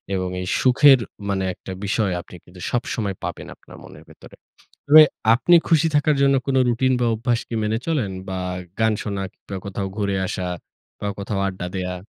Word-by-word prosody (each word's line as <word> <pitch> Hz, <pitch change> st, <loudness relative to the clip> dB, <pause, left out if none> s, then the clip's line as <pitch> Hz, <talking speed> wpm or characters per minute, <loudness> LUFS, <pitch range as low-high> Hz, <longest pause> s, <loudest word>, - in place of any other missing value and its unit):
এবং 95 Hz, -1 st, -2 dB
এই 90 Hz, -, -5 dB
সুখের 135 Hz, +1 st, +6 dB, 0.3 s
মানে 95 Hz, -1 st, 0 dB
একটা 95 Hz, -, -10 dB
বিষয় 100 Hz, 0 st, 0 dB
আপনি 90 Hz, -, -14 dB, 0.4 s
সবসময় 110 Hz, -4 st, -2 dB
পাবেন -, -, -5 dB
আপনার -, -, -16 dB
মনের -, -, -13 dB
ভেতরে। -, -, -15 dB, 0.5 s
তবে 155 Hz, +2 st, +10 dB, 0.3 s
আপনি 150 Hz, +9 st, +4 dB
খুশি 165 Hz, -1 st, +3 dB
থাকার 145 Hz, +1 st, +3 dB
জন্য 140 Hz, 0 st, +4 dB
কোন 135 Hz, -, 0 dB
রুটিন 130 Hz, +2 st, +2 dB
বা -, -, +2 dB
অভ্যাস 120 Hz, +1 st, 0 dB
কি 115 Hz, -, -5 dB
মেনে 110 Hz, +1 st, 0 dB
চলেন 140 Hz, -12 st, 0 dB, 0.2 s
বা 95 Hz, -, -3 dB, 0.4 s
গান 110 Hz, 0 st, +3 dB
শোনা 100 Hz, -2 st, -3 dB
কিংবা 100 Hz, -, -10 dB
কোথাও 100 Hz, 0 st, -4 dB
ঘুরে 100 Hz, -2 st, -1 dB
আসা 90 Hz, -, -3 dB, 0.5 s
বা 105 Hz, -, -3 dB
কোথাও 100 Hz, 0 st, -3 dB
আড্ডা 95 Hz, -2 st, -5 dB
দেয়া? 90 Hz, -1 st, -3 dB
110 Hz, 175 wpm, -22 LUFS, 95-130 Hz, 0.5 s, তবে